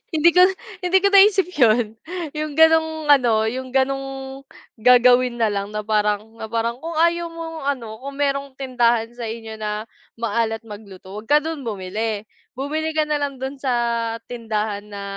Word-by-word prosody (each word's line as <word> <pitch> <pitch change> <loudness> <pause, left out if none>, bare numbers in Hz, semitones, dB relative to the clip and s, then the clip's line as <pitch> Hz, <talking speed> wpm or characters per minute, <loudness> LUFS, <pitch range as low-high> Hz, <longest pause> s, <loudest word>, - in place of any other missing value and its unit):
hindi 315 +2 +5
ko, 360 - +3 0.4
hindi 365 0 +2
ko 400 - +5
naisip 390 -2 +5
yun, 225 -2 +3 0.3
yung 305 -1 -4
ganong 320 -1 +4
ano 240 -6 +4
yung 255 +2 -5
ganong 270 0 -2 0.4
gagawin 250 +1 +5
na 225 -3 +1
lang 200 0 -3
na 210 - -2
parang 210 +1 -1
na 220 - -5
parang 230 +2 -2
kung 330 +3 -6
ayaw 340 +1 +2
mong 330 -1 -7 0.2
ano, 220 -3 -10
kung 275 +1 -8
merong 275 -1 -1
tindahan 240 -4 +1
sa 240 -1 -6
inyo 220 -1 -7
na 210 0 -3 0.3
maalat 225 0 -1
magluto, 205 -4 -11
wag 220 - -14
ka 295 0 +4
dun 320 -1 -4
bumili. 210 +2 -3 0.3
Bumili 310 +4 -3
ka 310 - +3
na 300 -1 -1
lang 285 -1 -2
dun 265 +2 -4
sa 265 -1 -1 0.6
tindahan 215 -3 -3
na, 200 -1 -8
250 Hz, 165 wpm, -21 LUFS, 220-295 Hz, 0.6 s, hindi